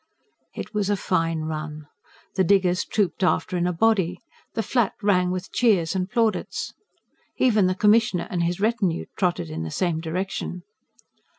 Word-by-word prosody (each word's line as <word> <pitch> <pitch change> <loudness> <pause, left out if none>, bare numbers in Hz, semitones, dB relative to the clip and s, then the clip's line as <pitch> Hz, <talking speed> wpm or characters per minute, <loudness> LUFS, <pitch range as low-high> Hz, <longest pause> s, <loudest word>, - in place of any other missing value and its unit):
It - - -6
was 205 -2 0
a 205 - +2
fine 165 -4 0
run. 155 -1 -5 0.5
The 190 - +2
diggers 185 -1 +3
trooped 200 -3 -1
after 185 +1 +1
in 175 0 +1
a - - +1
body; 185 -1 +2 0.4
the 225 - 0
Flat 235 0 +1
rang 180 -3 +3
with 185 +1 -4
cheers 200 -9 +2
and 185 0 -1
plaudits. 225 -1 -1 0.6
Even 215 -7 +4
the 185 - 0
Commissioner 210 -3 +3
and 175 - 0
his 170 +1 0
retinue 205 -5 0
trotted 175 - -1
in 80 +1 -4
the 80 - -4
same 170 - -1
direction. 180 +1 -4
185 Hz, 160 wpm, -24 LUFS, 170-205 Hz, 0.6 s, Even